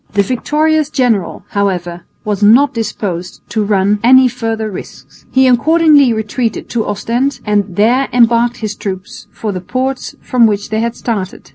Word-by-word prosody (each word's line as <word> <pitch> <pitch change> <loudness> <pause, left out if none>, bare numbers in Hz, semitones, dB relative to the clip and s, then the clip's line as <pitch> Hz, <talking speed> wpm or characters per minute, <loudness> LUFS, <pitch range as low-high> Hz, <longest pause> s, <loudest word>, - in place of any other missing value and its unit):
The 200 0 +3
victorious 300 +6 0
general, 240 - 0
however, 175 -4 -2 0.2
was 205 -1 -2
not 235 +8 +5
disposed 195 -6 -4
to 220 - -1
run 205 0 +1
any 260 +2 +6
further 225 -3 -3
risks. 185 - -11
He 260 0 +3
accordingly 290 +1 +4
retreated 220 +1 -3
to 230 -2 -2
Ostend 235 +7 -1
and 205 -3 0
there 245 +7 +2
embarked 240 0 +3
his 210 - -3
troops 195 0 -7
for 215 - -4
the 185 -2 -5
ports 260 +7 -3
from 240 -2 +2
which 205 0 -3
they 220 - 0
had 235 +1 -2
started. 200 -6 -5
225 Hz, 155 wpm, -14 LUFS, 205-255 Hz, 0.2 s, any